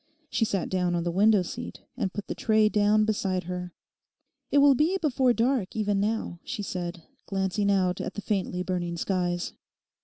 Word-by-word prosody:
She 225 - +2
sat 195 -5 -1
down 180 -2 0
on 170 - 0
the 175 - -1
window 205 +2 +4
seat - - -7
and 190 - -2
put 205 0 -5
the - - -4
tray 215 -1 +3
down 210 0 +3
beside 195 -4 0
her. 180 0 -5 0.8
'It - - +2
will 285 0 +7
be 315 +9 +2
before 265 -7 +2
dark 235 -3 0
even 205 -2 +1
now,' 210 -4 -1
she 215 -5 -4
said, 175 -3 -5 0.2
glancing 195 +1 0
out 185 -2 +2
at - - -5
the 205 - -4
faintly 185 -3 -1
burning 175 -2 -2
skies. 175 -1 -1
195 Hz, 180 wpm, -27 LUFS, 180-220 Hz, 0.8 s, will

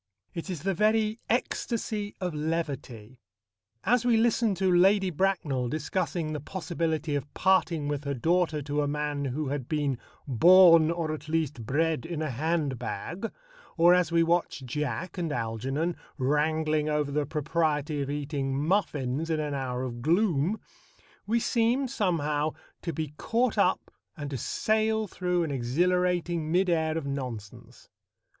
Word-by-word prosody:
It 170 +3 -6
is 170 -5 -5
the 195 0 +1
very 215 +3 +2
ecstasy 220 -3 -1
of 180 -3 -2
levity. 140 -7 -4 0.6
As 245 +3 +3
we 240 -2 +3
listen 225 -2 +2
to 185 -1 +2
Lady 190 +1 +4
Bracknell 155 -8 0
discussing 160 +1 -2
the 150 - -3
possibility 160 -2 -2
of 145 0 -3
parting 180 -5 +2
with 145 -1 -2
her 140 0 -1
daughter 160 +2 +1
to 145 +1 -1
a 145 - 0
man 145 -1 -2
who 135 +2 -2
had 135 -3 -4
been 145 -5 0 0.3
"born, 165 +4 +7
or 165 -2 -1
at 155 - -8
least 150 -8 -1
bred, 160 0 0
in 165 -2 -3
a 155 - -2
handbag," 150 - -2 0.5
or 175 +1 +7
as 180 -2 +2
we 170 0 +4
watch 170 -4 0
Jack 150 +7 -3
and 165 -3 -2
Algernon 135 +7 -2 0.2
wrangling 155 +2 +1
over 150 -1 0
the 145 -1 0
propriety 150 -1 0
of 140 - -3
eating 140 -2 -2
muffins 150 -4 0
in 160 -1 0
an 150 -1 -2
hour 130 -2 -2
of 120 -2 -5
gloom, 170 - +2 0.7
we 230 +3 +2
seem 240 +3 +1
somehow 155 -8 0 0.3
to 170 - -3
be 155 -1 -4
caught 235 0 +1
up 185 - +1 0.3
and 145 -2 -5
to 135 - -2
sail 220 - +1
through 180 -2 -1
an 160 - -3
exhilarating 170 +5 0
mid 180 +1 +3
air 160 -1 +1
of 160 - -3
nonsense. 125 -7 -6
160 Hz, 150 wpm, -28 LUFS, 145-180 Hz, 0.7 s, born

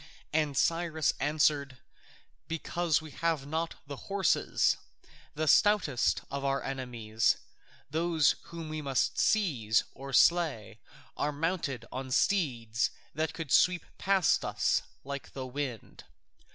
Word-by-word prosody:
And 150 -3 +1
Cyrus 165 -1 +1
answered, 145 -2 +1 0.7
"Because 165 0 0
we 155 - -10
have 160 -2 -1
not 160 +3 -2
the 140 -1 -7
horses. 195 -2 +2 0.6
The 155 +1 -1
stoutest 185 - +3
of 140 0 -3
our 135 0 0
enemies, 120 -5 0 0.5
those 160 0 +2
whom 165 -2 -7
we 155 0 -4
must 135 -3 0
seize 130 - +2
or 135 0 -8
slay, 155 - +3 0.4
are 150 - -1
mounted 145 -5 -2
on 130 +1 -5
steeds 125 - +1 0.2
that 155 +2 -2
could 160 -5 -6
sweep 180 +3 +4
past 195 -3 +3
us - - +1 0.2
like 140 0 -7
the 130 -1 -5
wind. 130 -3 -5
145 Hz, 120 wpm, -30 LUFS, 135-165 Hz, 0.7 s, sweep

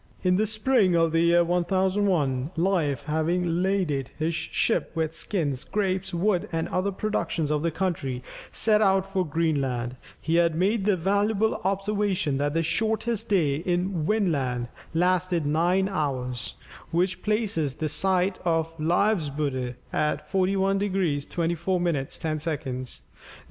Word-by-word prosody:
In 180 -1 +3
the 215 +3 +2
spring 215 -3 +2
of 165 -1 +3
the 165 - +2
year 170 +1 +4
1001, 180 -6 +1
Leif, 165 -6 +1
having 165 +3 0
laded 180 -9 0
his 160 +2 -1
ship - - 0
with 160 -1 -1
skins, 150 -9 -2
grapes, 190 -2 -1
wood, 190 +3 0
and 165 -1 -1
other 190 +2 0
productions 175 -7 -2
of 150 -1 +1
the 170 - +1
country, 155 -8 -2 0.3
set 215 -1 +3
out 195 -2 +3
for 195 -1 -1
Greenland; 140 -7 -1 0.2
he 165 +1 0
had 170 -2 +3
made 195 +4 +1
the 205 -3 +3
valuable 205 +4 +1
observation 195 -6 0
that 145 +1 -1
the 165 - +2
shortest 220 +4 0
day 155 -9 +2
in 175 +1 -1
Vinland 140 - 0 0.3
lasted 180 -1 +1
nine 175 +6 +2
hours, 130 -8 -3 0.3
which 180 +2 0
places 205 - 0
the 155 - -2
site 185 +3 +1
of 165 -2 0
Leifsbudir 150 - 0 0.2
at 150 0 0
41 195 +1 +2
degrees 185 -8 0
24 170 +2 -1
minutes 160 -6 -1
10 155 -1 -2
seconds. 130 -5 -4
175 Hz, 140 wpm, -26 LUFS, 155-195 Hz, 0.3 s, year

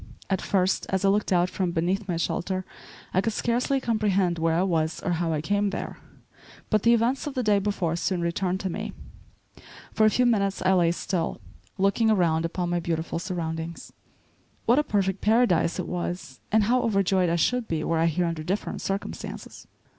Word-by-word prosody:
At 190 - +1
first, 190 -1 +1
as 190 0 0
I - - +5
looked 205 +1 +1
out 175 -1 +3
from 185 0 -2
beneath 185 +5 0
my 175 -3 -1
shelter 185 +2 -2 0.5
I 185 - +3
could 225 +2 -1
scarcely 245 +5 0
comprehend 200 -7 +1
where 165 0 +2
I 175 - +2
was 160 -4 0
or 180 - 0
how 170 -1 0
I 155 -2 -1
came 205 +5 +1
there; - - -5 0.7
but 215 -2 +3
the 235 +2 +5
events 245 +5 0
of 290 - -5
the 255 - 0
day 210 -2 +3
before 190 -5 -1
soon 180 +1 -1
returned 180 +2 -1
to 190 - -2
me. - - -5 1.0
For 215 - +4
a - - +6
few 250 +3 +2
minutes 200 -5 +1
I 190 +1 +4
lay 175 -2 +4
still, 170 -3 -2 0.4
looking 200 +4 +2
around 165 -6 +2
upon 175 +1 -2
my 175 - +1
beautiful 165 -1 -2
surroundings. 165 -2 -5 0.7
What 240 +5 +4
a - - +2
perfect 195 -6 0
paradise 215 -7 +3
it - - -3
was, 175 -6 -4
and 215 0 +4
how 245 +4 +2
overjoyed 195 -5 +2
I 170 - +1
should 240 +7 +1
be 160 -2 -2
were 165 0 0
I 165 - +3
here 175 +2 +1
under 165 -2 -2
different 185 +6 -3
circumstances. 195 +1 -5
185 Hz, 190 wpm, -26 LUFS, 170-210 Hz, 1.0 s, a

